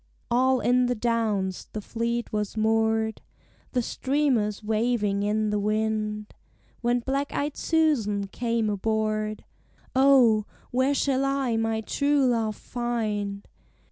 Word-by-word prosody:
All 255 +1 +3
in 250 0 +3
the 245 - 0
Downs 215 -5 -1
the 215 - -3
fleet 235 +2 -3
was 210 0 -2
moored, 220 0 +1 0.5
The 250 -2 +1
streamers 255 -7 0
waving 215 -2 0
in 210 +1 0
the 210 - 0
wind, 215 0 -1 0.5
When 240 0 +1
black 275 +3 -2
eyed 290 0 -1
Susan 250 -12 +1
came 230 +2 -1
aboard; 215 +1 -1 0.5
"O, 255 -6 +5 0.2
where 260 +3 +2
shall 270 -1 +1
I 275 -3 0
my 225 0 0
true 285 +4 +1
love 225 -4 +1
find? 215 -5 -3
225 Hz, 120 wpm, -26 LUFS, 215-250 Hz, 0.5 s, O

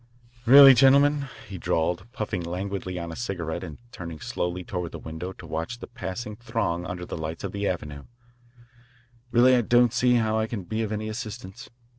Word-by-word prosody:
"Really, 135 +1 +10
gentlemen," 140 +2 +4 0.2
he 95 -2 -7
drawled, 90 +8 -1
puffing 105 -5 -3
languidly 95 +1 -4
on 85 -1 -5
a - - -7
cigarette 85 -8 -4
and 80 -5 -8
turning 85 -7 -8
slowly 90 +3 -3
toward 90 -2 -5
the - - -5
window 80 +4 -6
to - - -12
watch 80 +9 -4
the - - -8
passing 105 +4 -6
throng 105 -7 -2
under 90 0 -5
the - - -6
lights 80 +2 -5
of 100 - -3
the 100 0 -2
avenue, 75 -5 -4 1.2
"really 125 +2 +5
I 125 - +3
don't 120 +1 +4
see 125 0 +3
how 110 -2 +1
I 110 - 0
can 110 -4 -5
be 110 +5 -3
of 110 -2 -2
any 110 0 -3
assistance. 110 +1 -7
100 Hz, 185 wpm, -26 LUFS, 90-120 Hz, 1.2 s, Really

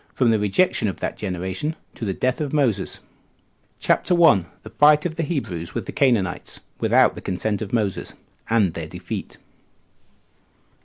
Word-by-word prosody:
From 125 -3 +3
The 110 - +2
Rejection 105 - +2
Of 95 - -3
That - - -3
Generation 95 - -2 0.2
To 115 - -6
The 95 - -1
Death 130 +3 -1
Of 145 -1 -3
Moses. 125 -10 0 0.8
CHAPTER 180 - +2
1. 135 - +5 0.3
Fight 150 +1 +6
Of 170 - -1
The 165 - -3
Hebrews 95 - -3
With - - -3
The - - -6
Canaanites 120 -10 0 0.2
Without - - +4
The - - -9
Consent 100 +2 -2
Of 105 - -5
Moses; 105 -5 -2 0.3
And 105 -7 +2
Their 80 -2 -5
Defeat. - - -7
110 Hz, 155 wpm, -22 LUFS, 95-145 Hz, 0.8 s, Fight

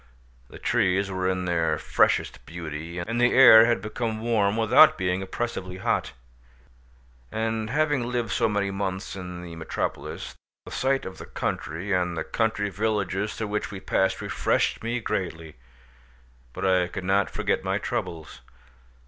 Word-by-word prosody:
The - - -11
trees 95 +2 +1
were 95 0 -1
in 90 -1 -1
their 80 -3 +1
freshest - - +1
beauty, 85 0 -6
and 115 +7 -2
the 125 - +4
air 115 -4 +9
had 120 -1 +1
become 110 +1 -3
warm 110 -2 +1
without 110 -1 +6
being 90 0 0
oppressively 95 -2 -4
hot. - - -1 1.2
After 110 0 -2
having 145 -4 +1
lived 120 -4 -1
so 110 - +2
many 100 -1 0
months 95 -1 -3
in 90 -2 -7
the 85 -1 -8
metropolis, 80 -1 -4 0.3
the - - -10
sight 135 +1 0
of 95 - -8
the - - -9
country, 90 +6 -3
and 90 -2 0
the - - -1
country 110 -3 -1
villages 105 0 -1
through 110 -2 -4
which 105 0 -2
we 100 - -7
passed 95 0 0
refreshed - - 0
me 120 +2 -1
greatly, 80 -7 -4 1.0
but 95 - -4
I 90 -2 +3
could 90 +1 -6
not 95 +1 +2
forget - - -1
my - - 0
troubles. 80 -2 -5
95 Hz, 155 wpm, -26 LUFS, 90-110 Hz, 1.2 s, air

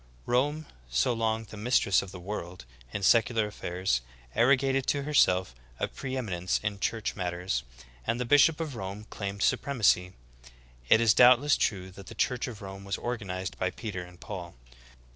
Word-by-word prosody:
Rome, 145 +6 +1 0.2
so 60 - +2
long 115 -1 0
the 110 0 -11
''mistress 105 -3 +3
of 95 - -8
the 90 - -9
world" 90 -5 -6 0.3
in 100 - -4
secular 115 +1 +4
affairs, 90 -9 -2 0.3
arrogated 135 - +3
to 140 -1 +1
herself 95 - +3 0.3
a - - 0
pre 130 0 -5
eminence 90 -7 -1
in 105 -1 -2
church 110 +1 -2
mat 90 -3 -2
ters, 90 +2 -2 0.5
and 115 +2 0
the 125 - -1
bishop 145 +5 +5
of 155 -5 -4
Rome 100 0 -6
claimed 100 -1 -4
supremacy. 100 -9 +2 0.8
It 110 - +6
is 115 -2 +5
doubtless 125 +5 +6
true 95 -3 -1
that 95 +1 -12
the - - -9
church 125 -1 0
at 115 -5 -8
Rome 95 0 -8
was 100 0 -3
organized 95 -7 -4
by 95 - +1
Peter 100 -2 -5
and 90 0 -12
Paul. 90 -4 -7
105 Hz, 170 wpm, -29 LUFS, 95-125 Hz, 0.8 s, It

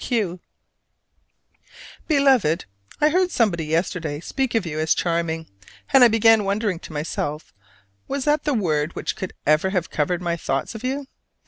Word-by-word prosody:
Q. 200 -8 0 1.7
Beloved: 265 - +3 0.3
I 300 - +4
heard 365 +3 +2
somebody 195 - +1
yesterday 160 -1 -1
speak 260 - -2
of 220 -5 +1
you 155 -2 -4
as 155 0 +2
"charming"; 165 -1 -1 0.5
and 270 -2 +8
I - - +9
began 225 -1 +4
wondering 200 -2 -1
to - - -11
myself 150 0 -4 0.5
was 275 -1 -3
that 295 0 +2
the 295 -3 0
word 155 -6 0
which - - -3
could 190 - -6
ever 155 +5 +3
have 180 -3 -2
covered 175 +4 -1
my 170 -1 0
thoughts 135 -4 -2
of 220 +1 -9
you? 270 +2 -2
185 Hz, 155 wpm, -23 LUFS, 160-245 Hz, 1.7 s, I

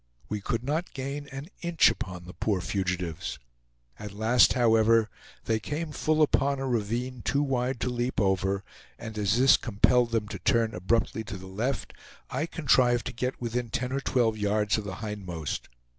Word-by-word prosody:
We 105 -1 -3
could 115 +3 -2
not 155 +6 -2
gain 140 +2 -4
an 135 +4 -7
inch 170 -1 +4
upon 90 -2 -6
the 90 - -10
poor 100 -4 0
fugitives. 90 -3 -2 0.6
At 105 -1 -7
last, 115 +3 +5
however, 115 -2 +4 0.3
they 110 -1 +1
came 150 +7 -4
full 155 +1 +2
upon 140 -1 +2
a 135 0 -3
ravine 120 +2 -2
too 140 +4 +1
wide 130 -2 -1
to 125 - 0
leap 120 +1 -1
over; 95 -1 +1 0.3
and 110 -1 -8
as 105 +1 +1
this 130 +2 +6
compelled 120 +2 +3
them 115 -2 -1
to - - -6
turn 115 -1 +2
abruptly 110 +4 0
to 105 -2 -6
the 95 - -10
left, 110 +9 -3 0.4
I 145 +6 -1
contrived 125 -7 +3
to - - -4
get 125 +2 -3
within 120 0 -2
ten 125 +3 -2
or 135 - 0
twelve 115 -5 +1
yards 105 +1 +1
of 105 - -7
the 95 -2 -5
hindmost. 90 -8 -5
115 Hz, 175 wpm, -28 LUFS, 105-130 Hz, 0.6 s, this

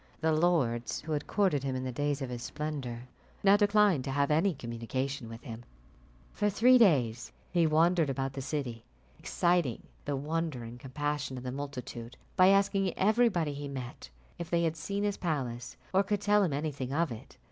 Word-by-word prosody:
The 160 0 +2
lords 145 -9 +1
who 155 - -7
had 150 -1 -2
courted 190 -9 +2
him 135 -1 -2
in 130 - -3
the 130 - -3
days 145 +2 -1
of 125 - -5
his 120 -1 -5
splendour, 140 -5 -4 0.4
now 200 0 +7
declined 205 -7 +4
to - - -3
have 140 +2 +1
any 165 +4 +2
communication 125 +1 -4
with 115 +1 -9
him. 115 -3 -8 0.7
For 210 0 +1
three 245 +5 +5
days 125 - +3 0.2
he 170 -2 +3
wandered 165 0 +3
about 135 0 -2
the 135 - -5
city, 130 -5 -4 0.4
exciting 175 -9 +1 0.2
the 145 - -1
wonder 155 -2 -2
and 115 +1 -9
compassion 145 +1 -3
of 125 - -7
the 125 - -4
multitude 125 -3 -6 0.2
by 185 -1 +6
asking 195 -1 +3
everybody 200 -7 +2
he 145 0 -5
met 130 - -7 0.3
if 170 - -5
they 170 0 +2
had 165 -1 0
seen 200 +5 -3
his 205 -1 0
palace, 125 -7 -3 0.2
or 190 - +5
could 205 0 -1
tell 210 0 +4
him 185 -6 +1
anything 140 -3 -3
of 160 +1 +1
it. 110 - -10
145 Hz, 185 wpm, -30 LUFS, 130-175 Hz, 0.7 s, now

